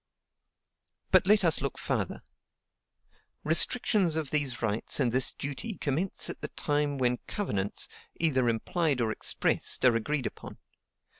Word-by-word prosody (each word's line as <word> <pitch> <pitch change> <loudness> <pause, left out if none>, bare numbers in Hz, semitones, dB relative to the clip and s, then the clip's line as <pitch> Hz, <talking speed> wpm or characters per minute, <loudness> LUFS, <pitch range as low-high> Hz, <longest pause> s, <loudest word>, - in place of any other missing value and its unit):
But 190 - +4
let 205 0 +5
us 160 -4 +3
look 140 -2 -3
farther: - - -3 1.2
"Restrictions 180 +1 +4
of 155 -4 -3
these 145 -5 +1
rights 110 +4 -1
and 125 -4 +1
this 130 +2 +2
duty 145 - -6
commence 155 +7 -1
at - - -7
the - - -4
time 145 -1 -2
when 125 -1 +1
covenants, 100 - -2 0.3
either 130 -7 +2
implied 140 +5 -1
or 115 -2 0
expressed, 120 - 0
are 125 -2 +5
agreed 135 +4 -2
upon. - - -7
145 Hz, 135 wpm, -28 LUFS, 125-165 Hz, 1.2 s, let